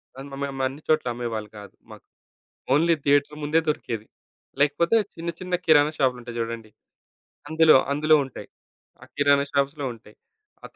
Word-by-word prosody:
ఆహ్, 135 +1 -9 0.2
మేము 135 -1 -4
అన్ని 140 +4 -9
చోట్ల 155 -4 +2
అమ్మేవాళ్ళు 115 -3 -5
గాదు 100 -2 -12 0.2
మాకు. - - -13 0.7
ఓన్లీ 165 +4 +4
థియేటర్ 145 +1 +2
ముందే 155 +3 +2
దొరికేది. 115 -7 -3 0.5
లేకపోతే 170 +8 +2 0.2
చిన్న 170 +1 -4
చిన్న 180 0 -3
కిరాణా 150 -2 +5
షాపులుంటాయి 125 -3 -1
చూడండి. 115 -1 -5 0.8
అందులో, 160 -1 +6 0.2
అందులో 155 +2 +3
ఉంటాయి. 130 - -10 0.5
ఆ - - -10
కిరాణా 145 -1 +3
షాప్స్‌‌‌‌‌‌లో 140 0 -1
ఉంటాయి. 110 -2 -19 0.5
ఆ - - -5
140 Hz, 140 wpm, -24 LUFS, 120-155 Hz, 0.8 s, అందులో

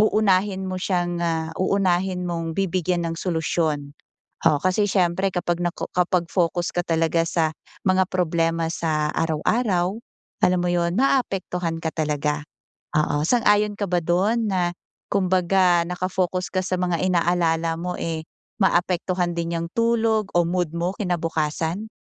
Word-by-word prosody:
uunahin 200 -2 +2
mo 185 - -3
siyang, 175 -2 -1
ah, 160 -1 -1
uunahin 185 -1 +1
mong 165 -1 -3
bibigyan 180 -2 0
ng 165 - -2
solusyon 160 -4 -1 0.5
oo. 155 -3 +6
Kasi 185 +3 +2
siyempre 185 0 +2
kapag 175 -1 -1
nako 175 0 -3
kapag 180 -1 +1
focus 175 -1 0
ka 175 - +1
talaga 165 0 +2
sa 160 -2 +1 0.4
mga 185 0 +4
problema 165 -2 0
sa 155 -3 0
araw-araw 180 +4 +1 0.5
alam 180 -1 +3
mo 180 - +1
'yon, 170 0 +1
maaapektuhan 185 -10 0
ka 160 - -1
talaga, 150 -1 -1 0.6
oo. 150 -1 +1
Sang-ayon 210 -2 +3
ka 200 - 0
ba 180 - +3
do'n 200 +7 +2
na 180 -2 +1 0.4
kumbaga 185 -2 +3
naka-focus 185 0 -1
ka 185 - +1
sa 185 0 -1
mga 175 -2 0
inaalala 170 -2 +1
mo, 180 0 -3
eh, 160 -1 -3 0.4
maapektuhan 180 -1 +1
din 170 0 -2
yang 170 0 -4
tulog 225 -2 +2
o 175 - +6
mood 175 -1 0
mo 175 +2 -1
kinabukasan? 165 +1 -1
175 Hz, 140 wpm, -23 LUFS, 165-185 Hz, 0.6 s, oo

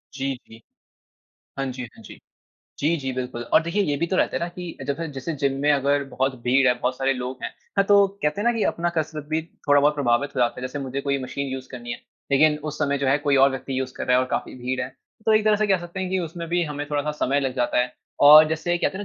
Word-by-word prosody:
जी, 135 0 -2
जी। 115 +1 -15 1.0
हाँ 135 - -1
जी, 125 - -6
हाँ - - -15
जी। - - -12 0.6
जी, 160 +4 +1
जी, 135 -3 -4
बिल्कुल 125 -1 -4
और - - +6
देखिए, 170 +5 0
ये 145 -6 0
भी 170 - -1
तो 185 - -1
रहता - - +1
है - - -2
ना 170 - -2
कि 180 -2 -7
जब 140 0 -1
से 165 - -4
जैसे 135 +5 -4
जिम 140 -1 +3
में 145 - +3
अगर 140 0 +1
बहुत 130 0 0
भीड़ 130 +2 +3
है, 125 - +5
बहुत 125 +1 -1
सारे 135 0 +1
लोग 125 0 -5
हैं, - - -3 0.3
हाँ, 200 - +4
तो 200 -1 +6 0.2
कहते 150 +6 0
हैं 225 - -1
ना - - +3
कि 220 - 0
अपना 175 +1 -2
कसरत 155 -1 -2
भी 160 +1 0 0.3
थोड़ा 145 0 +6
बहुत 145 +1 +3
प्रभावित 140 0 +1
हो - - +1
जाता 120 -1 +2
है। - - -10
जैसे 130 +3 -6
मुझे 135 0 -4
कोई 140 0 -1
मशीन 140 +2 -4
यूज़ 130 -1 -6
करनी 120 -2 -6
है, 120 - -6 0.3
लेकिन 150 +2 +4
उस 150 - -9
समय 140 -2 0
जो 140 - -1
है 135 +2 +4
कोई 145 -2 +1
और 140 - +4
व्यक्ति 135 0 -4
यूज़ 130 -1 -3
कर - - -4
रहा 125 - +4
है 130 - +3
और 130 - -4
काफ़ी - - -2
भीड़ 130 +1 -3
है। 125 - -3 0.4
तो 220 - +5
एक 215 - +3
तरह 215 -1 +4
से 215 +1 +1
कह 195 -2 +3
सकते 175 +2 -7
हैं 190 - -2
कि 190 - +1
उसमे 170 -1 -5
भी 175 +1 +1
हमें 145 -1 -5
थोड़ा-सा 145 +1 0
समय 140 +2 +1
लग 135 -2 -2
जाता 120 0 +1
है 125 0 0 0.3
और 155 +1 +10
जैसे 165 +2 -1
कहते - - 0
हैं 205 - -5
140 Hz, 280 wpm, -24 LUFS, 130-165 Hz, 1.0 s, और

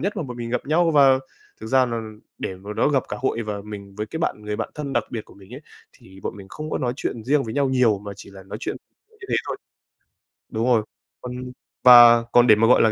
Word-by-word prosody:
nhất 200 +5 -2
mà - - -2
bọn 125 -4 -7
mình 115 -1 -5
gặp 125 - -2
nhau, 165 +3 +2
và 135 -3 +5 0.4
thực 110 - -7
ra 130 +2 +3
là 115 -1 -3 0.4
để 95 - -4
mà 100 +3 -8
nói - - +2
gặp 135 - +2
cả - - -4
hội 120 -3 -1
và 105 -1 -4
mình 100 -2 -9
với 105 0 -3
cái 160 - -6
bạn 105 - -2
người 105 0 -4
bạn - - -3
thân 145 -3 -5
đặc - - 0
biệt 110 -2 -5
của - - -18
mình 100 +4 -14
ấy, 135 - -9 0.3
thì 95 +1 -17
bọn - - -5
mình 100 - -11
không 155 0 -7
có - - -1
nói 125 -1 -1
chuyện 115 -4 -4
riêng 140 +2 +2
với 110 0 -6
nhau 140 -2 +1
nhiều 125 -6 +2
mà 100 0 -8
chỉ - - -12
là 95 -1 -12
nói 95 - -8
chuyện 390 - -4 0.3
như 435 -4 -14
thế - - 0
thôi. - - -3 0.9
Đúng 110 +1 -2
rồi. 115 -4 +3 0.4
Còn 125 0 -6 0.5
và 120 -2 +9
còn 120 0 +5
để 110 - +8
mà, 115 +1 +3
gọi 125 - +5
là, 110 - +4
120 Hz, 265 wpm, -22 LUFS, 105-135 Hz, 0.9 s, và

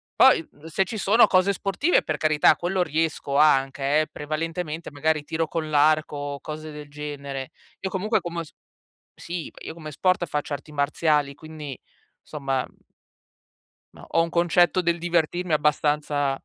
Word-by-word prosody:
Poi, 260 -12 +5
mhmm, 145 +2 -18
se 175 +4 +1
ci 220 +4 -5
sono 215 +3 +5
cose 185 +2 +3
sportive, 200 - +1
per 155 - -2
carità, 155 0 +4
quello 180 +3 0
riesco 155 -3 -1
anche, 140 0 +3
eh, 155 - -2
prevalentemente 160 +2 -4
magari 150 +1 0
tiro 160 +1 -2
con 155 0 -3
l'arco 155 0 +3
o 145 0 -4
cose 155 0 -7
del 150 -1 -9
genere. 140 -2 -6 0.3
Io 190 - -2
comunque 210 +4 0
come 170 -1 -4
s 155 - -15 0.6
sì, 170 -1 -6
io - - -6
come 155 -2 -9
sport 180 +4 +1
faccio 150 0 -3
arti 145 +2 -7
marziali, 150 0 +1
quindi, 150 -4 -8 0.4
somma 135 -3 -2 1.3
no, - - -13
ho 165 - +3
un 165 - -3
concetto 175 +1 +3
del 170 -1 0
divertirmi 175 0 0
abbastanza 150 -1 +1
155 Hz, 155 wpm, -24 LUFS, 145-170 Hz, 1.3 s, Poi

